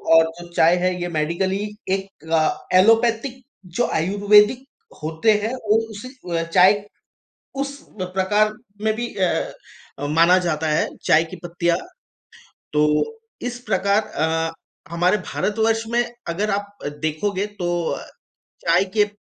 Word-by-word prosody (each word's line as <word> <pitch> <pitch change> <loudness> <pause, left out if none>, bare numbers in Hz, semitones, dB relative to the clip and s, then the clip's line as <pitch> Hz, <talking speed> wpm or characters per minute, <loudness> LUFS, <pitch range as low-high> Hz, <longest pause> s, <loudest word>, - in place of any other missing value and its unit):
और 165 0 +7 0.2
जो 175 0 -12
चाय 170 +1 +5
है 185 +1 +1
ये 175 - -1
मेडिकली 170 +5 -1 0.4
एक 195 0 -5 0.7
एलोपैथिक 230 +6 +3 0.4
जो 245 - +3
आयुर्वेदिक 205 +7 +4 0.4
होते 160 +8 +2
हैं 225 +3 -1
वो 220 -4 +1
उस 210 +3 -8 0.3
अ, 165 - 0
चाय 185 +5 +4 0.8
उस 280 0 -3 0.2
प्रकार 190 +4 +1 0.3
में 220 0 +2
भी 240 +1 -4
अ 185 -3 +1 0.7
अ, 145 - -3
माना 165 +5 +5
जाता 155 -1 -1
है 150 0 +2 0.2
चाय 160 +2 +5
की - - -5
पत्तियाँ। 170 0 0 1.0
तो 150 0 +4 0.6
इस 245 - -8
प्रकार 200 +1 +3
अ, 160 -5 -1 0.4
हमारे 175 +4 +2
भारतवर्ष 220 +3 0
में 240 0 +3 0.2
अगर 195 +6 -1
आप 200 0 -3 0.2
देखोगे 185 +6 -1
तो 175 -1 -1 1.0
चाय 170 +3 +4
के 210 - +6
प 205 0 -13
190 Hz, 130 wpm, -22 LUFS, 170-215 Hz, 1.0 s, और